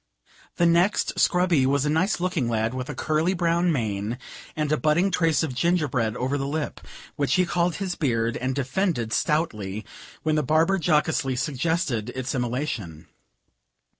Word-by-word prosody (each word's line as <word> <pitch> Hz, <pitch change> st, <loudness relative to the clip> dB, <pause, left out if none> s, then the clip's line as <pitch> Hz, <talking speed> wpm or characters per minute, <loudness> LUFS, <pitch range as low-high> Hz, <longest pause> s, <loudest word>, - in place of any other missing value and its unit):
The 170 Hz, -, +2 dB
next 170 Hz, +4 st, +2 dB
scrubbee 175 Hz, -7 st, +3 dB
was 140 Hz, +1 st, +1 dB
a -, -, +1 dB
nice 170 Hz, +6 st, +1 dB
looking 175 Hz, -9 st, -1 dB
lad, 110 Hz, 0 st, 0 dB
with 130 Hz, +2 st, -5 dB
a 150 Hz, -, -4 dB
curly 160 Hz, +4 st, 0 dB
brown 170 Hz, 0 st, +2 dB
mane, 110 Hz, -4 st, -2 dB, 0.4 s
and 150 Hz, -1 st, -1 dB
a -, -, +4 dB
budding 165 Hz, +6 st, +2 dB
trace 165 Hz, -3 st, +2 dB
of 150 Hz, -5 st, -2 dB
gingerbread 125 Hz, -7 st, 0 dB
over 135 Hz, +3 st, -1 dB
the 135 Hz, -, -2 dB
lip, 150 Hz, +1 st, -3 dB, 0.4 s
which 140 Hz, -2 st, +1 dB
he 185 Hz, -1 st, +3 dB
called 175 Hz, 0 st, 0 dB
his 190 Hz, -3 st, -3 dB
beard, 115 Hz, -7 st, 0 dB
and 130 Hz, +1 st, -2 dB
defended 140 Hz, -, -1 dB
stoutly, 110 Hz, -, -1 dB, 0.4 s
when 155 Hz, -, +1 dB
the 155 Hz, -, +2 dB
barber 160 Hz, +7 st, +2 dB
jocosely 150 Hz, -4 st, +1 dB
suggested 140 Hz, -, -1 dB
its 130 Hz, -1 st, -3 dB
immolation. 120 Hz, -, -3 dB
150 Hz, 160 wpm, -25 LUFS, 125-170 Hz, 0.4 s, a